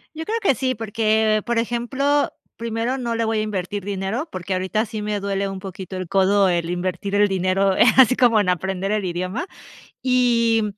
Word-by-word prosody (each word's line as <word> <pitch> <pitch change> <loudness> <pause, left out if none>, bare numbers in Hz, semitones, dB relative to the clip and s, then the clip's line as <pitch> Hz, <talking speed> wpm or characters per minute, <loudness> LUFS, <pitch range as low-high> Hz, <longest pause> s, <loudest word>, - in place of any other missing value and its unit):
Yo 320 - -5
creo 450 +2 -1
que 370 - +3
sí, 255 +1 -1
porque, 220 -1 +1
por 235 -1 0
ejemplo, 260 +5 0 0.3
primero 230 +3 -2
no 235 -2 -2
le 230 0 0
voy 220 0 0
a - - +1
invertir 205 -1 -3
dinero, 200 - -3
porque 185 +1 -5
ahorita 185 +4 0
sí 220 -1 -6
me 210 0 -2
duele 200 0 -2
un 195 0 -5
poquito 190 0 -8
el 185 0 -4
codo, 195 +2 +3
el 170 -1 -1
invertir 180 +2 -3
el 205 0 +4
dinero, 190 0 +1
eh, - - +7
así 255 -2 +7
como 240 -3 +4
en 200 -3 +2
aprender 190 +2 -2
el 210 -2 0
idioma, 185 - -3 0.6
y 235 -3 +2
210 Hz, 195 wpm, -22 LUFS, 190-235 Hz, 0.6 s, eh